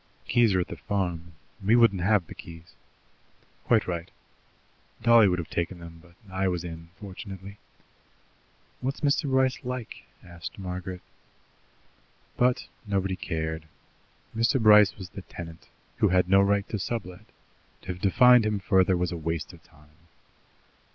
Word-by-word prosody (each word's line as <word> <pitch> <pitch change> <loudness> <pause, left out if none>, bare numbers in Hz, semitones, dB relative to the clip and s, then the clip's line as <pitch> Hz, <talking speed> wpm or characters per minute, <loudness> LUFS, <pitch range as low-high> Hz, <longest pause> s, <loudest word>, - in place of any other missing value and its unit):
"The - - -6
keys 115 -5 +4
are - - +3
at 90 - -1
the - - -7
farm; 90 -5 -3 0.3
we 105 +4 +4
wouldn't 115 -6 +4
have 100 -1 +2
the - - -10
keys." 85 0 -12 0.9
"Quite 115 -3 +3
right." 85 -2 -4 0.9
"Dolly 115 -2 +7
would 90 -1 +1
have 85 -3 -6
taken 85 +2 -2
them, 85 -1 -11
but 85 0 -20 0.2
I 95 +1 0
was 90 -2 -1
in, 85 -1 -8
fortunately." 100 0 -9 1.2
"What's 135 +2 -3
Mr. 145 -1 +1
Bryce 130 -1 +2
like?" 125 -2 -6 0.2
asked 85 -2 -9
Margaret. 90 -1 -6 1.3
But 125 0 +2 0.2
nobody 95 -2 0
cared. 80 -3 -4 0.7
Mr. 115 +4 +2
Bryce 105 -3 +6
was 95 -3 -8
the 100 - -9
tenant, 85 -2 -10 0.3
who - - +3
had 90 -1 +3
no 95 +1 +5
right 100 0 +1
to 105 - -3
sublet; 90 -4 -5 0.6
to - - -12
have 90 - -13
defined 125 +4 +6
him 105 -1 0
further 95 -1 +2
was 90 0 -1
a 85 - -4
waste 80 -1 -4
of - - -15
time. 75 +1 -23
95 Hz, 150 wpm, -27 LUFS, 85-110 Hz, 1.3 s, Dolly